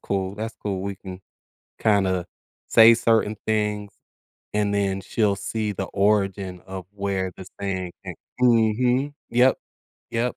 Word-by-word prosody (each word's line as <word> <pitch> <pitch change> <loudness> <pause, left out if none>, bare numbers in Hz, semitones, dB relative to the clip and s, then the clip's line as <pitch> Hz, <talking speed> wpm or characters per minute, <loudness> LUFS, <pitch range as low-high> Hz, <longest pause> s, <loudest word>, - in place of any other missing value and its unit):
cool, 95 0 -2
that's 110 +1 -4
cool, 95 -3 -2
we 100 0 -3
can 90 0 -9 0.6
kinda 95 -4 +2 0.4
say 115 +1 +8
certain 115 -2 +2
things, 105 -1 0 0.6
and 105 -1 +1
then 95 -1 0
she'll 100 +1 0
see 105 +3 -2
the - - -3
origin 100 -2 0
of 95 -2 -7
where 100 -2 -2
the 95 - -10
saying 95 -3 -3
came - - -6 0.3
Mhm, 125 +4 +3 0.2
yep, 125 +2 +4 0.5
yep, 120 +2 -1
100 Hz, 135 wpm, -24 LUFS, 95-110 Hz, 0.6 s, say